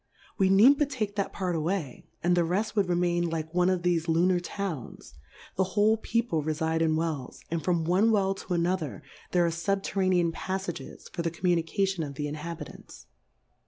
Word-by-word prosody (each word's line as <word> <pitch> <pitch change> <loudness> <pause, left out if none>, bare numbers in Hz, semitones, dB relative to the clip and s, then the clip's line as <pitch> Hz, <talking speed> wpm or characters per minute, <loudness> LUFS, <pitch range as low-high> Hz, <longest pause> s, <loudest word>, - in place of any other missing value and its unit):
We 190 -1 +4
need 230 +9 +6
but 295 -2 +2
take 215 -7 -3
that 200 -2 -1
Part 180 -3 -2
away, 160 -4 -3 0.2
and 175 +1 +3
the 175 - +3
reft 190 +7 -1
would 200 -4 +2
remain 175 -1 +1
like 160 0 -4
one 180 +1 +3
of 185 -2 0
thefe 175 -2 +1
Lu 165 +2 +3
nar 185 -1 +3
Towns; 175 - -6 0.4
the 190 - +4
who^e 210 +4 +2
People 230 -9 0
refide 160 +2 -1
in 160 -1 +2
Wells, 155 -5 -3
and 165 -1 -1
from 170 -3 +1
one 185 +7 +3
Well 195 -3 +2
to 185 -2 -4
another 170 -3 -1 0.3
there 175 -1 +3
are - - +2
fubterranean 185 -1 +1
Paffages 185 -4 -5
for 175 - -2
the 165 - 0
Communication 175 +2 0
of 140 -2 -6
the 150 +1 -3
Inhabitants. 150 - -8
175 Hz, 180 wpm, -28 LUFS, 165-195 Hz, 0.4 s, need